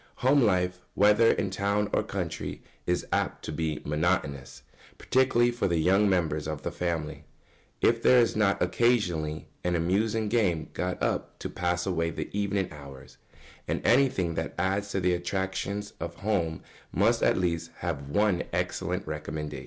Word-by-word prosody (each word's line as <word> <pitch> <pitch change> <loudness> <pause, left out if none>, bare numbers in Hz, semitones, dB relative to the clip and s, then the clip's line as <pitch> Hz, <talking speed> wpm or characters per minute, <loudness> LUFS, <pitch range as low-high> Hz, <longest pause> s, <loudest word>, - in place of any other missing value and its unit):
] - - -36
Home 140 +2 +5
life, 90 -5 +2 0.2
whether 105 +3 +5
in 95 - -1
town 100 +2 0
or - - +3
country, - - -4 0.2
is 90 0 0
apt - - -1
to - - -4
become 80 -1 -3
monotonous, 75 -3 -1 0.3
particularly 125 -2 +3
for 120 -3 -1
the 85 -2 +1
young 95 +5 +4
members 80 -5 0
of 75 -2 -4
the - - -2
family, 85 -4 -3 0.6
if 115 0 +3
there 125 - +6
is 120 - +2
not 105 -2 +2
occasionally 90 -7 +1 0.2
an 90 0 +1
amusing 105 +6 +1
game 100 -8 +1
got 90 0 -3
up - - -1
to - - -6
pass 90 0 -1
away 85 -3 0
the 85 - -6
evening 100 -2 0
hours, 70 -3 -12 0.5
and - - -1
anything 120 -9 +3
that - - -4
adds 100 +3 0
to 100 - -1
the 90 -1 +2
attractions 95 +3 -3
of 85 0 -5
home 90 -6 -1 0.3
must - - +2
at - - +3
least 85 -2 -1
have 70 -5 -3
one 100 +2 +2
excellent - - -2
recommendation. 75 -2 -5
90 Hz, 160 wpm, -28 LUFS, 80-105 Hz, 0.6 s, there